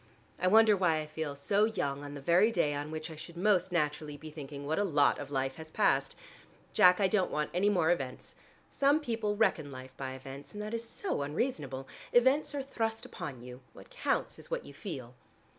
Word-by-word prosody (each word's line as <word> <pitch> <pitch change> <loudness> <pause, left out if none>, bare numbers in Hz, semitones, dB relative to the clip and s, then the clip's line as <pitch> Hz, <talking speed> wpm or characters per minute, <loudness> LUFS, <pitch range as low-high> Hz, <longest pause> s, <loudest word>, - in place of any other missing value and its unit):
I 185 - +1
wonder 220 +2 +7
why 180 -4 +2
I 155 - -2
feel 155 -1 -4
so 200 +9 +2
young 145 -10 -2
on 145 0 -7
the 140 - -7
very 180 +9 +4
day 160 -8 +1
on 145 +1 -4
which 155 +1 -5
I - - -8
should 170 +2 -10
most 190 -1 +2
naturally 150 -2 -1
be 155 +1 -10
thinking 145 -2 -8
what 155 +5 0
a - - +3
lot 145 -7 +3
of - - -6
life 135 -1 -1
has 160 0 -9
passed. 135 -3 +2 0.6
Jack, 180 +1 +6
I 195 - +4
don't 190 -1 +1
want 150 0 -2
any 190 +4 +3
more 175 -5 +3
events. 135 -7 -3 0.3
Some 280 +2 +3
people 225 -7 -1
reckon 165 -9 +1
life 130 0 -10
by 130 -1 -4
events, 135 +1 -9
and 210 - -5
that 215 +2 -5
is 230 0 -2
so 390 - -3
unreasonable. 145 - -2 0.3
Events 265 +4 +4
are 280 - -2
thrust 225 -4 -2
upon 125 -4 -7
you; 125 +1 -10
what - - -14
counts - - -1
is - - -12
what - - -3
you - - -11
feel." 130 - -7
160 Hz, 210 wpm, -31 LUFS, 140-210 Hz, 0.6 s, wonder